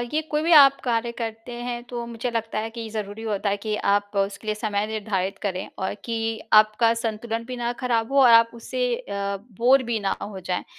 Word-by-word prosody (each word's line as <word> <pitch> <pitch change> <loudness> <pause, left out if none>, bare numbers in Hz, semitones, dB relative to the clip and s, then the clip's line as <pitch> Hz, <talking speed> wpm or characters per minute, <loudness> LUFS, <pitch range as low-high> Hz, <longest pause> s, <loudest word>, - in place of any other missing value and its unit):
ये 310 - +3
कोई 300 0 0
भी 335 +2 +2
आप 275 -3 +8
कार्य 235 -1 0
करते 225 +1 -5
हैं 240 -1 -4
तो 240 -1 -4
मुझे 235 +1 -4
लगता 225 -2 -2
है 225 +1 -3
कि 230 -1 -7
ज़रूरी 215 0 -5
होता 210 -2 -1
है 200 - 0
कि 215 +1 -3 0.2
आप 205 0 +1
उसके 200 +2 -1
लिए 215 - 0
समय 210 -1 -1
निर्धारित 200 -3 -2
करें 190 -3 -3
और 190 - -2
कि 230 -1 -2 0.4
आपका 215 +2 +5
संतुलन 230 0 -3
भी 250 +1 -6
ना 240 0 -2
ख़राब 235 0 0
हो 280 - +3
और 245 - +7
आप 230 0 +7
उससे 250 +2 -3
अ, 200 -4 -4 0.2
बोर 260 +2 +5
भी 235 -2 -1
ना 195 - -1
अ, - - -3
हो 200 -2 -7
जाएँ। 180 0 -3
225 Hz, 220 wpm, -24 LUFS, 205-240 Hz, 0.4 s, आप